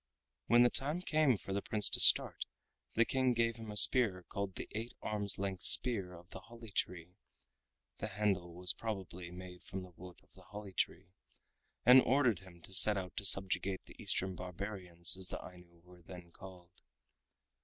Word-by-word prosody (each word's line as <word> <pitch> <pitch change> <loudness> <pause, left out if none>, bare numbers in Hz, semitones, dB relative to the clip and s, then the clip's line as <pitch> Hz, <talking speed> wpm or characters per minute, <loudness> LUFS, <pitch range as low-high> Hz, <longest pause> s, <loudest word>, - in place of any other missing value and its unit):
When 120 +1 +5
the 120 - +3
time 150 +6 -2
came 155 - +1
for 95 - -8
the 100 - -2
Prince 105 -2 +2
to - - +1
start, - - +7 0.5
the 115 - +3
King 130 0 0
gave 115 0 -1
him 110 -1 -10
a 105 - -5
spear 100 -6 +4
called 100 -1 -5
the - - -7
Eight 115 +3 -7
Arms 105 -2 -3
Length 95 -1 -5
Spear 100 -8 +1
of 85 +1 -16
the - - -10
Holly 115 -2 -14
Tree 90 -1 -4 0.8
(the 110 - -4
handle 100 -4 -2
was 90 0 0
probably 95 -5 -7
made 90 0 -11
from 95 0 -7
the 90 - -14
wood 90 0 -13
of - - -30
the - - -17
holly 105 -1 -11
tree), 90 +1 -3 0.7
and 125 +2 +8
ordered 130 -7 +1
him 90 -3 -17
to 95 - -10
set 105 +2 +6
out 90 -1 -7
to - - -4
subjugate 95 0 +1
the - - -16
Eastern 95 0 0
Barbarians 90 -2 -1
as 95 -1 -3
the - - -6
Ainu 90 -2 -15
were 90 0 -19
then 85 0 -13
called. 90 -1 -15
95 Hz, 185 wpm, -33 LUFS, 90-110 Hz, 0.8 s, and